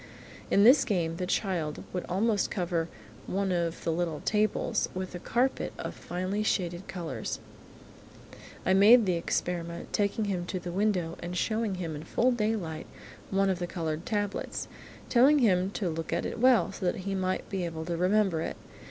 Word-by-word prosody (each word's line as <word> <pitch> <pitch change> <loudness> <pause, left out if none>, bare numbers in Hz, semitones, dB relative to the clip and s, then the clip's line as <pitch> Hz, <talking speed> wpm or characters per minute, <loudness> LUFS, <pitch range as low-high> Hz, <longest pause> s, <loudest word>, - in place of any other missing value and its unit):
In 200 - +5
this 260 +5 +8
game 165 -5 -1
the 180 0 -2
child 175 -6 -1
would 180 - -2
almost 205 +3 +1
cover 170 -3 -1 0.4
one 195 0 0
of 170 -2 -1
the 165 - 0
little 165 -2 -1
tables 215 +2 +1
with 185 0 -4
a 175 - -5
carpet 250 +8 0
of - - -5
finely 185 +4 -3
shaded 180 -3 -1
colours. 170 -3 -4 1.3
I 185 - +4
made 215 +4 +7
the 185 - +2
experiment, 170 0 -2
taking 205 +1 +1
him 180 -3 -2
to 185 - -2
the 175 0 -6
window 185 -4 0
and 175 +1 -4
showing 220 0 0
him 170 -4 -4
in 145 - -6
full 245 +9 +2
daylight 210 -9 -2 0.4
one 195 0 +2
of 185 - -2
the 175 - -2
coloured 165 -1 -3
tablets, 205 -2 -2 0.4
telling 265 +5 +6
him 190 -8 +3
to 195 - -1
look 165 -1 -3
at 170 - 0
it - - -4
well, 245 -7 +5
so 190 - -8
that 180 - -1
he 195 +1 -3
might 185 -1 -1
be 190 -2 -2
able 160 -2 -4
to 170 - -2
remember 185 -1 +2
it. - - -4
185 Hz, 180 wpm, -29 LUFS, 170-210 Hz, 1.3 s, this